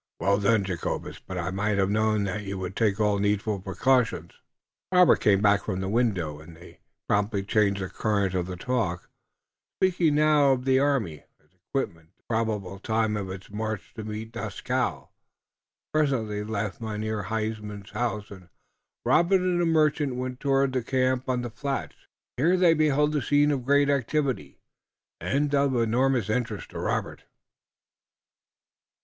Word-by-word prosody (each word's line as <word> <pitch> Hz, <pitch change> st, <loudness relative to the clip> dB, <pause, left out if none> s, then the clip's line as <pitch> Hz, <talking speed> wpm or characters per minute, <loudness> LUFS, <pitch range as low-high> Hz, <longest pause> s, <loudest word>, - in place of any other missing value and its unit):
"Well 100 Hz, +1 st, +2 dB
done, 105 Hz, +1 st, +3 dB
Jacobus, 90 Hz, -3 st, -4 dB
but 95 Hz, -, -8 dB
I 90 Hz, +1 st, -2 dB
might 100 Hz, +2 st, 0 dB
have 95 Hz, 0 st, +2 dB
known 110 Hz, 0 st, +2 dB
that 100 Hz, +1 st, -2 dB
you 100 Hz, -1 st, -5 dB
would 95 Hz, 0 st, -5 dB
take 105 Hz, -2 st, +1 dB
all 105 Hz, -1 st, +2 dB
needful 105 Hz, +1 st, 0 dB
precautions." 110 Hz, -1 st, +1 dB, 0.6 s
Robert 180 Hz, -1 st, +6 dB
came 100 Hz, -1 st, +3 dB
back 100 Hz, -1 st, +3 dB
from 95 Hz, -3 st, -2 dB
the 95 Hz, -, -3 dB
window, 95 Hz, -9 st, 0 dB
and 80 Hz, +1 st, -13 dB
they 85 Hz, -, -15 dB, 0.3 s
promptly 105 Hz, -1 st, +1 dB
changed 100 Hz, -1 st, +1 dB
the -, -, -3 dB
current 100 Hz, -2 st, 0 dB
of 90 Hz, -1 st, -1 dB
the 90 Hz, -, -5 dB
talk, 90 Hz, -4 st, -2 dB, 0.7 s
speaking 175 Hz, -5 st, +2 dB
now 150 Hz, -2 st, +4 dB
of 125 Hz, 0 st, -3 dB
the 130 Hz, 0 st, +4 dB
army, 130 Hz, -, 0 dB
its 75 Hz, +3 st, -34 dB
equipment, 90 Hz, -, -5 dB
and 95 Hz, -, -43 dB
the -, -, -42 dB
probable 105 Hz, -4 st, -2 dB
time 110 Hz, +1 st, 0 dB
of 100 Hz, -2 st, -4 dB
its 95 Hz, +1 st, -8 dB
march 110 Hz, -1 st, -4 dB
to 110 Hz, -, -7 dB
meet 110 Hz, +1 st, -6 dB
Dieskau. 110 Hz, -3 st, -3 dB, 0.8 s
Presently 125 Hz, -9 st, 0 dB
they 105 Hz, -, -7 dB
left 105 Hz, -1 st, -3 dB
Mynheer 110 Hz, -2 st, -3 dB
Huysman's 105 Hz, -2 st, -4 dB
house, 105 Hz, -4 st, -3 dB
and 90 Hz, -3 st, -12 dB, 0.6 s
Robert 180 Hz, +3 st, +4 dB
and 180 Hz, -1 st, +1 dB
the 170 Hz, -, +2 dB
merchant 150 Hz, -4 st, +2 dB
went 125 Hz, 0 st, -4 dB
toward 135 Hz, -1 st, +2 dB
the 130 Hz, -, +1 dB
camp 130 Hz, +1 st, 0 dB
on 125 Hz, -1 st, 0 dB
the 120 Hz, -, -5 dB
flats. 140 Hz, +3 st, -5 dB, 0.3 s
Here 170 Hz, +8 st, +3 dB
they 175 Hz, -2 st, +5 dB
beheld 150 Hz, -1 st, +2 dB
a 145 Hz, -, +1 dB
scene 145 Hz, +2 st, +3 dB
of 130 Hz, -4 st, -2 dB
great 140 Hz, +1 st, +4 dB
activity 140 Hz, 0 st, -1 dB, 0.6 s
and 140 Hz, -, 0 dB
of 140 Hz, -2 st, +2 dB
enormous 120 Hz, 0 st, +2 dB
interest 110 Hz, -1 st, -2 dB
to -, -, -6 dB
Robert. -, -, -3 dB
110 Hz, 165 wpm, -26 LUFS, 100-135 Hz, 0.8 s, Robert